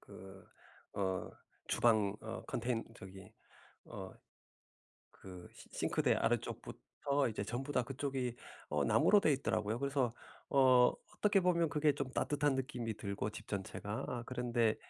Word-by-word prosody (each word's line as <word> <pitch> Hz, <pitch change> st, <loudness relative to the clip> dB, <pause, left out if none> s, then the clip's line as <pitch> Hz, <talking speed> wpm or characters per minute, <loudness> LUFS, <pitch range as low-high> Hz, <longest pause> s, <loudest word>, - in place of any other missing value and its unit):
그 95 Hz, 0 st, -12 dB, 0.5 s
어 95 Hz, -2 st, -1 dB, 0.4 s
주방 110 Hz, -4 st, +3 dB
어 110 Hz, +1 st, -6 dB
컨텐 120 Hz, -1 st, -1 dB
저기 95 Hz, -2 st, -11 dB, 0.5 s
어 -, -, -7 dB, 1.0 s
그 90 Hz, -2 st, -11 dB
시 -, -, -14 dB
싱크대 -, -, +1 dB
아래쪽부터 140 Hz, -1 st, -1 dB
이제 105 Hz, -2 st, -3 dB
전부 130 Hz, +7 st, -4 dB
다 125 Hz, -, +2 dB
그쪽이 130 Hz, -1 st, -3 dB, 0.3 s
어 75 Hz, -1 st, +1 dB
나무로 115 Hz, -, +5 dB
되어 160 Hz, -, +3 dB
있더라고요. 110 Hz, -5 st, 0 dB
그래서 140 Hz, -3 st, 0 dB, 0.4 s
어 130 Hz, -3 st, +6 dB, 0.2 s
어떻게 205 Hz, -2 st, +4 dB
보면 170 Hz, -2 st, +3 dB
그게 150 Hz, 0 st, +3 dB
좀 140 Hz, -2 st, -3 dB
따뜻한 145 Hz, -1 st, +1 dB
느낌이 125 Hz, -4 st, -3 dB
들고 100 Hz, +1 st, -3 dB
집 110 Hz, 0 st, -10 dB
전체가 100 Hz, +1 st, -4 dB
아 120 Hz, -2 st, -3 dB
그런데 120 Hz, -3 st, +1 dB
120 Hz, 270 characters per minute, -35 LUFS, 105-140 Hz, 1.0 s, 어